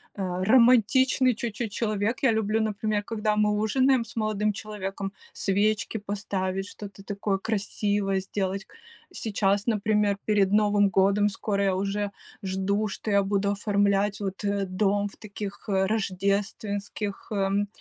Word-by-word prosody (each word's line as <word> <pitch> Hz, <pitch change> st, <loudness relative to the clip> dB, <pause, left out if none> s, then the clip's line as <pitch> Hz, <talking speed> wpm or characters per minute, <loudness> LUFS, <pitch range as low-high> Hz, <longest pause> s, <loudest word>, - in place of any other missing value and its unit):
э, 185 Hz, -2 st, -2 dB
романтичный 250 Hz, +2 st, +5 dB
чуть-чуть 225 Hz, -1 st, -4 dB
человек. 215 Hz, +1 st, -1 dB
Я 260 Hz, -, +5 dB
люблю, 220 Hz, 0 st, +1 dB
например, 215 Hz, -1 st, -1 dB
когда 210 Hz, -1 st, -1 dB
мы 210 Hz, 0 st, +3 dB
ужинаем 245 Hz, +4 st, +2 dB
с 225 Hz, +1 st, -13 dB
молодым 215 Hz, -1 st, +1 dB
человеком, 200 Hz, -2 st, -5 dB, 0.2 s
свечки 210 Hz, +3 st, 0 dB
поставить, 195 Hz, -2 st, -3 dB
что-то 200 Hz, -1 st, -10 dB
такое 200 Hz, -1 st, -2 dB
красивое 205 Hz, -1 st, -1 dB
сделать. 195 Hz, +1 st, -3 dB, 0.5 s
Сейчас, 200 Hz, -1 st, 0 dB
например, 210 Hz, -2 st, +2 dB
перед 200 Hz, -3 st, +2 dB
Новым 205 Hz, -1 st, +4 dB
годом, 200 Hz, +2 st, +3 dB
скоро 200 Hz, 0 st, -1 dB
я 195 Hz, -1 st, +2 dB
уже 200 Hz, +1 st, -1 dB, 0.3 s
жду, 195 Hz, +2 st, 0 dB
что 210 Hz, -, -5 dB
я 200 Hz, -1 st, +4 dB
буду 200 Hz, 0 st, 0 dB
оформлять 200 Hz, 0 st, +1 dB
вот, 195 Hz, -1 st, -4 dB
э, 200 Hz, -1 st, 0 dB
дом 200 Hz, +2 st, +1 dB
в 200 Hz, -, -12 dB
таких, 205 Hz, -1 st, -7 dB
э, 190 Hz, -1 st, +2 dB
рождественских, 200 Hz, 0 st, -2 dB
эм, 200 Hz, 0 st, +1 dB
205 Hz, 135 wpm, -26 LUFS, 195-215 Hz, 0.5 s, романтичный